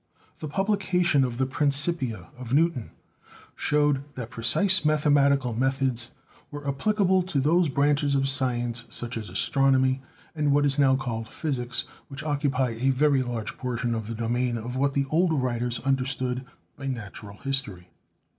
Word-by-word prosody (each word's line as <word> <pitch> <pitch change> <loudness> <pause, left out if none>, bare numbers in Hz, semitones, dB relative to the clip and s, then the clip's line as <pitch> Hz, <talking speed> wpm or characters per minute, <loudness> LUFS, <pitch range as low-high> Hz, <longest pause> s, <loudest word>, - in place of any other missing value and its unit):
The 155 - -5
publi 195 +5 0
cation 180 -7 +2
of 120 -2 -2
the 130 - +1
"Principia" 140 - 0
of 125 0 -3
Newton 160 -7 +1 0.7
showed 145 -2 +1
that 120 -2 -6
precise 140 - +3
mathematical 140 -4 +3
methods 130 -1 0 0.4
were 145 -1 -8
applicable 190 +6 +2
to 175 -6 -2
those 165 +4 +3
branches 145 +1 +2
of 135 0 +1
science 120 -3 0
such 120 0 -3
as 110 -4 -5
astronomy, 130 +6 +2 0.3
and 150 -3 0
what 145 0 +3
is 140 0 +2
now 135 -2 +5
called 115 -4 -4
physics, 130 -6 -2 0.2
which 140 +1 -7
occupy 140 -4 0
a 120 +4 0
very 135 +1 +3
large 120 -4 -4
portion 120 -1 -2
of 110 -2 -4
the 115 - -5
domain 120 +1 -1
of 120 +3 -6
what 140 +1 +1
the 140 0 +1
older 165 +1 +2
writers 125 -3 -1
understood 130 -1 -1 0.3
by 135 - -7
natural 105 -4 -7
history. 135 -11 -3
135 Hz, 155 wpm, -26 LUFS, 120-145 Hz, 0.7 s, now